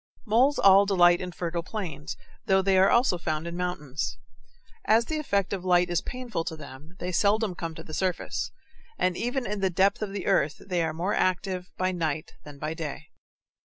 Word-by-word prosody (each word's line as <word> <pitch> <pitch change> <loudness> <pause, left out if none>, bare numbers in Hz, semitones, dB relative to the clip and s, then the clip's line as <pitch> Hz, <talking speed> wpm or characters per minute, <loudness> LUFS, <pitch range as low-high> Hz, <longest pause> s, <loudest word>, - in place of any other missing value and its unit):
Moles 250 +6 +3
all 195 +1 +6
delight 175 -2 +5
in 180 -1 -4
fertile 170 0 -3
plains, 170 -5 -5 0.3
though 190 0 +4
they 195 0 +3
are 190 - +6
also 235 -7 +3
found 155 -1 -2
in 170 0 -5
mountains. 155 -6 -3 0.7
As 225 +2 +4
the 310 +3 -2
effect 200 -11 0
of 190 -2 -3
light 180 -1 +3
is 175 - +1
painful 245 -9 -4
to 160 - -4
them, 150 +3 -12
they 180 +1 -4
seldom 210 +2 +2
come 165 -2 -5
to 160 - -8
the 155 - -11
surface, 185 +1 -1 0.5
and 185 -1 +1
even 245 +4 -2
in 210 +1 -3
the 190 -1 +2
depth 195 +4 +2
of 210 -2 -3
the 195 -2 -4
earth 140 0 +2
they 180 -3 -2
are 160 - 0
more 175 +6 -2
active 185 0 0
by 185 0 +1
night 160 -4 -2
than 145 -1 -11
by 155 +2 -3
day. 160 -3 -6
180 Hz, 195 wpm, -27 LUFS, 165-200 Hz, 0.7 s, all